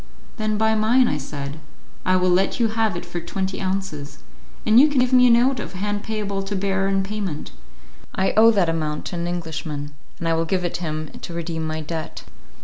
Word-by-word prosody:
"Then 215 -1 0
buy 220 +1 +3
mine," 230 +4 +4
I 150 - 0
said; 140 +1 -6 0.5
"I 185 - +4
will 185 0 +3
let 190 +6 +2
you 230 -2 +3
have 220 -4 0
it 175 - -6
for 175 0 -5
twenty 190 +3 -3
ounces, 185 -7 -3 0.5
and 220 +2 +6
you 290 - +8
can 285 -4 +2
give 250 +1 +1
me 250 0 +7
a - - +5
note 245 +2 +4
of - - -6
hand 205 +2 -2
payable 205 -3 -3
to 195 +1 -4
bearer 195 0 0
in 195 0 +1
payment. 195 -6 -4 0.6
I 190 - +2
owe 225 +1 +7
that 200 -6 +3
amount 155 -2 -2
to - - -4
an 170 0 -2
Englishman, 160 -4 -4 0.2
and 170 - -3
I 165 - +3
will 165 0 +1
give 180 +1 0
it 175 - -2
him 155 -3 -4
to 170 - -6
redeem 165 -1 -3
my 155 0 -3
debt." 160 +1 -5
190 Hz, 215 wpm, -23 LUFS, 165-215 Hz, 0.6 s, you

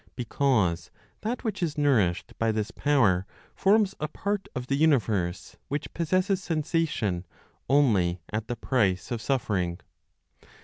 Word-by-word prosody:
Because 110 - +1 0.3
that 230 +3 -3
which 215 -4 -3
is 160 -4 -1
nourished 115 -12 +2
by 115 0 +2
this 110 0 -2
power 105 -12 +2 0.3
forms 200 0 +3
a 150 - -1
part 200 +5 -3
of 125 -1 -3
the 135 - 0
universe, 110 - +1
which 145 +1 -4
possesses 185 +3 +1
sensation 155 - -1 0.5
only 105 -11 +3
at 105 0 -2
the 120 - -2
price 105 -4 0
of 120 -2 -2
"suffering." 100 -9 -1
130 Hz, 130 wpm, -27 LUFS, 100-160 Hz, 0.5 s, forms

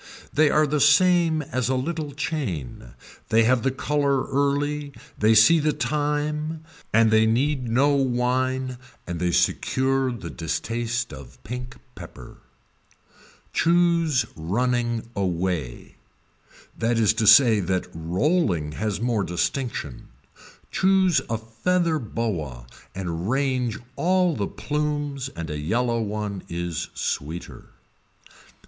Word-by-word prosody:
They 150 0 +4
are 155 +1 +3
the 150 +1 0
same 160 +2 +4
as 130 -2 -2
a 130 - +1
little 150 +3 -3
chain, 100 - -4 0.3
they 115 +1 +4
have 125 +1 +3
the 135 - +1
color 140 0 0
early, 145 +1 0 0.2
they 110 +1 +3
see 160 +10 +7
the 150 0 +1
time 150 +1 -2 0.3
and 110 0 +4
they 110 0 +4
need 130 +2 0
no 130 +5 +3
wine 130 -1 0 0.3
and 85 -1 -5
they 90 0 0
secure 130 +8 +1
the 100 -9 -7
distaste 115 +7 -3
of 65 -2 -11
pink 125 +3 -6 0.2
pepper. - - -11 1.2
Choose 170 -6 +2
running 120 +6 -1
anyway, 90 - -3 0.8
that 115 +1 0
is 110 -2 +4
to 110 -1 0
say 110 0 +7
that 95 -1 -1
rolling 85 - 0
has 105 +5 -3
more 115 -3 0
distinction, 90 - -3 0.6
choose 190 -3 +3
a 115 - 0
feather 160 +10 0
boa 85 - -4 0.3
and 90 0 -3
range 130 -3 0 0.2
all 180 -1 +2
the 100 -2 -2
plumes 145 -2 -3
and 85 -1 -5
a 75 - -4
yellow 115 +9 0
one 105 -2 -3
is 85 -1 -4
sweeter. 80 +5 -4
125 Hz, 120 wpm, -24 LUFS, 100-145 Hz, 1.2 s, see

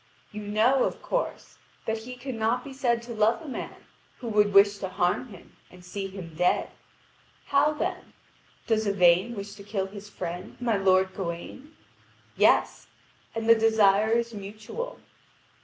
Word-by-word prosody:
You 210 -1 -6
know, 220 +6 +3
of - - -3
course, - - -3 0.3
that 220 0 -1
he 250 +3 -8
cannot 245 -1 -1
be 275 - -9
said 240 -3 0
to 235 0 -7
love 220 +1 +2
a 320 - -11
man 265 - -7 0.3
who 240 - -6
would 210 -1 +3
wish 200 +1 +5
to 190 - -4
harm 180 +6 0
him 195 -7 -15
and 180 0 -16
see 195 +2 -4
him 185 -4 -9
dead. 180 +3 +1 0.7
How 285 +2 +3
then? 300 - -4 0.5
Does 220 -2 +1
Yvain 190 +3 +4
wish 200 0 -6
to 200 -1 -12
kill 200 -1 -2
his 200 +1 -10
friend, 175 -2 -6
my 240 -3 +1
lord 190 -1 +3
Gawain? 195 - -6 0.6
Yes, - - +3 0.5
and 225 0 -3
the 230 - +9
desire 220 -2 +4
is 235 0 0
mutual. 215 - -7
210 Hz, 155 wpm, -27 LUFS, 195-235 Hz, 0.7 s, the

